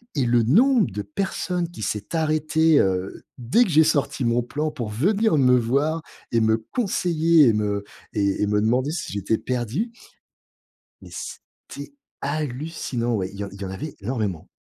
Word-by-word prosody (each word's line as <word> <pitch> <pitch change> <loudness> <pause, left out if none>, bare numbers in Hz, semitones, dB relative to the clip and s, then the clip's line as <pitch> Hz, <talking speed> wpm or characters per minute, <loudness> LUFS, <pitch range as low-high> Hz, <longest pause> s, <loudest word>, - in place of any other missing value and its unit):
et 135 -4 +1
le 120 0 +3
nombre 225 - +4
de 105 +2 -4
personnes 180 - -2
qui 140 -11 -8
s'est 105 - -3
arrêté, 155 0 +3
heu, 95 0 -1 0.2
dès 130 - +3
que - - -4
j'ai 160 -1 +6
sorti 145 -4 0
mon 115 +1 +2
plan 150 +6 -3
pour 120 -7 -5
venir 195 - +2
me 125 -2 +5
voir 140 +7 0 0.3
et 115 - +3
me 110 0 +3
conseiller 170 - +3
et - - +3
me 105 -1 -1 0.3
et 100 -2 0
et 105 - +2
me 105 0 +2
demander 125 +6 +1
si 160 - -4
j'étais 100 +2 0
perdu 125 - -2 1.1
mais - - -13
c'était - - -9 0.3
hallucinant. 140 -4 -3
Ouais. 95 -3 -2
Il 100 - -11
y - - -2
en 100 - -8
il 100 - -12
y - - -4
en 95 - -5
avait 95 +11 -6
énormément. 100 -7 -3
130 Hz, 175 wpm, -23 LUFS, 105-160 Hz, 1.1 s, j'ai